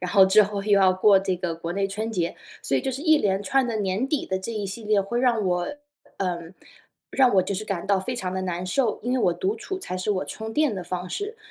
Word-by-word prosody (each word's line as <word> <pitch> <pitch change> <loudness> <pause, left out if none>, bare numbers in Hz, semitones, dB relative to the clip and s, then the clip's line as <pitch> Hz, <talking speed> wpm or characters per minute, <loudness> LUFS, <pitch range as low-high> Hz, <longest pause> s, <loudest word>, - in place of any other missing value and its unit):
然 180 0 -3
后 195 -2 +7
之 210 +3 +6
后 205 0 -3
又 210 - +1
要 190 -1 +5
过 195 +1 +5
这 190 -1 -1
个 175 -2 -3
国 165 +1 -5
内 195 +1 0
春 215 +3 -3
节， 170 -3 -1 0.3
所 135 - +1
以 - - +1
就 - - -1
是 265 - -5
一 315 0 +5
连 195 -4 +1
串 265 +5 +2
的 230 - -2
年 205 +4 -1
底 290 0 -1
的 190 - -1
这 210 +5 -5
一 210 -2 -3
系 200 +4 -7
列 210 -1 +3
会 235 +5 -2
让 235 -5 +2
我 180 +9 -1 0.4
呃， 180 -3 -1 0.7
让 260 -3 +4
我 185 - +6
就 200 - -3
是 210 +3 -4
感 195 -4 -4
到 200 -1 +2
非 250 +7 -4
常 185 -4 -3
的 185 - -2
难 180 0 -3
受。 230 +3 0
因 245 +2 -1
为 260 - +2
我 180 -7 +3
独 190 +4 -1
处 380 - -5
才 185 - -5
是 185 +3 -2
我 185 -7 0
充 220 +9 -6
电 300 -6 +2
的 185 - -4
方 180 +1 -5
式， 415 - -4
200 Hz, 290 characters per minute, -25 LUFS, 185-230 Hz, 0.7 s, 后